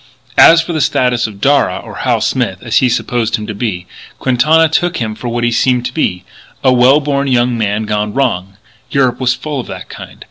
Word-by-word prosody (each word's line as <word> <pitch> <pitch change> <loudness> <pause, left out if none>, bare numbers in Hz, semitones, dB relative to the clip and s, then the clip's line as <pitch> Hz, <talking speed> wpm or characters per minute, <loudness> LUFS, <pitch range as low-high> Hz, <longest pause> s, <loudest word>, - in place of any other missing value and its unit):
As 165 0 +7
for 170 - -5
the 155 - -1
status 125 -3 +1
of 100 -2 -12
Darragh 140 -9 +1
or - - -10
Hal - - 0
Smith, - - -2
as - - 0
he 130 - +3
supposed 115 -1 -1
him 105 - -5
to 105 - -5
be 100 -5 -4 0.3
Quintana 150 +6 +3
took 175 +2 0
him 110 -3 -3
for 120 - -7
what 120 0 -2
he 120 - +1
seemed 125 +1 +1
to - - -4
be, 90 - -1 0.4
a 130 - +4
well 125 +4 +5
born 140 -1 -1
young 125 -1 +1
man 105 -1 -1
gone 105 0 -2
wrong. 100 -7 -2 0.3
Europe 130 -3 +1
was 125 -1 +1
full 150 -3 -5
of 125 - -6
that - - -8
kind. - - -11
125 Hz, 215 wpm, -14 LUFS, 110-140 Hz, 0.4 s, As